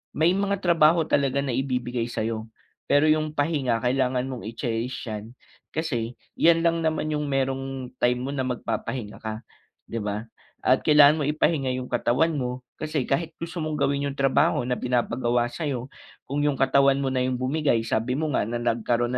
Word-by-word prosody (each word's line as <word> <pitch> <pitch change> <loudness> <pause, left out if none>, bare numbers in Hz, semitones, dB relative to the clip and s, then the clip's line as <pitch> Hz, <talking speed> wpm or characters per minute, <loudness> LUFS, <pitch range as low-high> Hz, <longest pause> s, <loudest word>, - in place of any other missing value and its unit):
may 160 +3 +4
mga 200 0 0
trabaho 165 -1 +5
talaga 140 -2 +1
na 135 - -2
ibibigay 125 -2 -1
sayo, 110 -1 -3 0.4
pero 150 +2 +4
'yung 155 0 +1
pahinga 145 -6 0
kailangan 125 0 +1
mong 120 -4 -6
i-cherish 115 +1 -3
yan, 110 +2 -7 0.4
kasi, 125 -7 -2 0.2
'yan 165 0 +5
lang 170 0 +2
naman 155 -1 -1
'yung 150 -1 -1
merong 135 -1 -2
time 125 0 +3
mo 135 - -3
na 130 -2 -2
magpapahinga 120 -2 -4
ka, 110 0 -6 0.5
'di 115 - -2
ba? 105 +1 -3 0.4
At 130 +1 +4
kailangan 150 0 +7
mo - - 0
ipahinga 150 -2 +1
'yung 125 -1 -6
katawan 125 +7 +2
mo, 125 -3 -3 0.2
kasi 155 -3 -1
kahit 160 +6 -1
gusto 165 +1 -6
mong 155 -1 -2
gawin 140 -1 0
'yung 140 - -5
trabaho 135 -2 +2
na 125 0 -2
pinapagawa 120 -1 0
sayo, 135 -3 -4 0.3
kung 140 +2 -3
yung 145 - +1
katawan 135 +1 +4
mo 135 - 0
na 130 - 0
'yung 130 0 0
bumigay 130 -2 +1
sabi 115 +3 -1
mo 155 0 -1
nga 105 - 0
na 120 - -3
nagkaroon 120 0 0
135 Hz, 175 wpm, -25 LUFS, 120-150 Hz, 0.5 s, kailangan